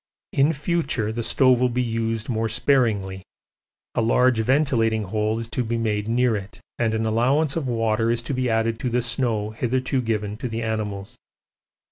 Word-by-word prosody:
In 140 +3 +4
future 150 -7 -1
the 120 +1 -3
stove 125 +1 +3
will 125 - +3
be 125 +1 0
used 115 -1 -2
more 115 -2 -1
sparingly, 110 -7 +1 0.7
a - - +1
large 120 +1 +3
ventilating 115 -3 +2
hole 105 +3 -1
is 115 0 -5
to 125 - -1
be 115 0 -2
made 105 -2 -1
near 120 0 +2
it 100 -1 -7 0.2
and 115 -2 +1
an 110 0 -1
allowance 130 +7 +2
of 160 -5 -2
water 115 -1 +1
is 115 0 0
to 140 - -3
be 130 -1 0
added 115 0 0
to 125 - -1
the 120 0 0
snow 115 -3 -1
hitherto 130 +3 -1
given 105 -3 -2
to 125 +2 -4
the 115 +1 -3
animals. 105 -3 -4
115 Hz, 180 wpm, -23 LUFS, 110-125 Hz, 0.7 s, In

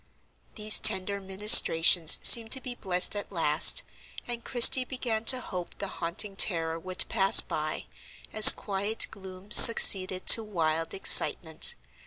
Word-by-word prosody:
These 215 0 +1
tender 200 -2 -1
ministrations 190 -4 +2
seemed 225 -1 +4
to 265 - -3
be 255 -1 -11
blessed 185 -4 -4
at 205 - -12
last; 165 - -1 0.4
and 240 -1 -10
Christie 255 +1 +2
began 240 -4 -10
to 255 +2 +1
hope 180 -7 -13
the 200 - -10
haunting 180 +4 -8
terror 165 -4 -3
would 185 +2 -5
pass 195 0 +1
by, - - -6 0.5
as 215 - +6
quiet 205 +2 -7
gloom 190 +1 -17
succeeded 190 -5 +5
to 225 - +4
wild 165 -5 -8
excitement. 160 -4 +1
195 Hz, 135 wpm, -22 LUFS, 180-220 Hz, 0.5 s, as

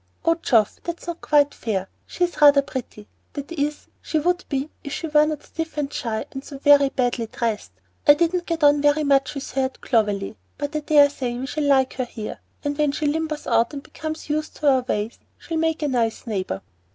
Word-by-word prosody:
"Oh, 330 - +5
Geoff, 235 -10 +2
that's 340 0 -6
not 345 -1 -5
quite 290 -1 +3
fair. 195 -4 -2 0.2
She's 355 -3 -2
rather 285 -1 +7
pretty, 245 -6 -7 0.3
that 285 +2 -6
is, 295 -2 -2 0.2
she 315 - -1
would 355 +4 +1
be 275 +1 -2
if 280 - -6
she 315 - -3
were 300 -1 +4
not 305 -2 -3
stiff 325 -1 -6
and 285 -2 -2
shy 220 -2 -2
and 270 - -7
so 280 - -9
very 285 0 +6
badly 245 -3 -1
dressed. 215 - -3 0.3
I 290 - +9
didn't 345 +2 0
get 330 -2 -2
on 290 0 +6
very 290 +1 +3
much 275 -1 +2
with 275 - -5
her 265 +1 +1
at 260 - -6
Clovelly, 210 -3 0 0.2
but 290 +1 -4
I - - +2
dare 295 -1 +5
say 245 -4 -3
we 255 - -4
shall 300 +2 -2
like 265 -2 +3
her 255 - 0
here; 220 -3 -7 0.2
and 290 0 -1
when 295 -2 +2
she 305 - -2
limbers 310 0 -1
out 230 +2 +2
and 280 -1 -6
becomes 315 0 -6
used 305 +1 -2
to 295 - +2
our 260 -1 +3
ways, 220 -2 -3 0.2
she'll 330 - -4
make 320 -1 0
a - - +1
nice 235 -4 0
neighbor." 190 - -3
285 Hz, 215 wpm, -23 LUFS, 250-305 Hz, 0.3 s, I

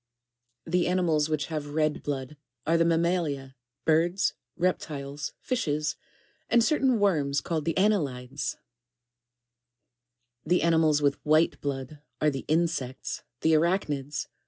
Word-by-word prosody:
17. 180 +2 +1
The - - +1
animals 165 -4 +2
which 150 -2 0
have 150 -2 -5
red 155 -1 +1
blood, 140 0 -4 0.3
are 165 - +2
the 165 - +4
mammalia, 165 -5 0 0.3
birds, 170 +4 +2 0.2
reptiles, 145 -5 -2
fishes, 150 - -1 0.5
and 235 0 +5
certain 265 -4 +2
worms 150 -9 +2
called 160 -3 -2
"Annelides." 145 -9 0 1.9
18. - - -13
The - - -1
animals 160 -3 +3
with 140 -1 +1
white 155 +2 +3
blood, 140 +1 -4 0.2
are 150 0 +3
the 135 -1 -5
insects, 155 -5 -1 0.2
theArach 165 +4 +3
nides. 145 0 -3
155 Hz, 120 wpm, -27 LUFS, 145-170 Hz, 1.9 s, and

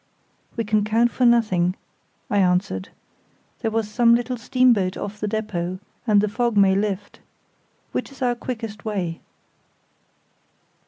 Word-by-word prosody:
"We 230 - 0
can 215 -1 +1
count 230 +3 +2
for 250 - +2
nothing," 190 -7 +3 0.5
I 205 - +1
answered. 180 - +1 0.7
"There 225 - -1
was 220 -1 -1
some 235 +2 +4
little 245 +1 -1
steamboat 235 -6 +2
off 205 +1 -6
the 210 - -2
depôt, 185 -4 -3 0.3
and 205 -2 +5
the 210 - +1
fog 235 +1 -1
may 195 -1 +5
lift. 200 0 -2 0.7
Which - - -3
is 270 -1 -7
our 245 -1 +2
quickest 225 -3 -6
way?" 185 -6 -3
215 Hz, 140 wpm, -23 LUFS, 195-235 Hz, 0.7 s, and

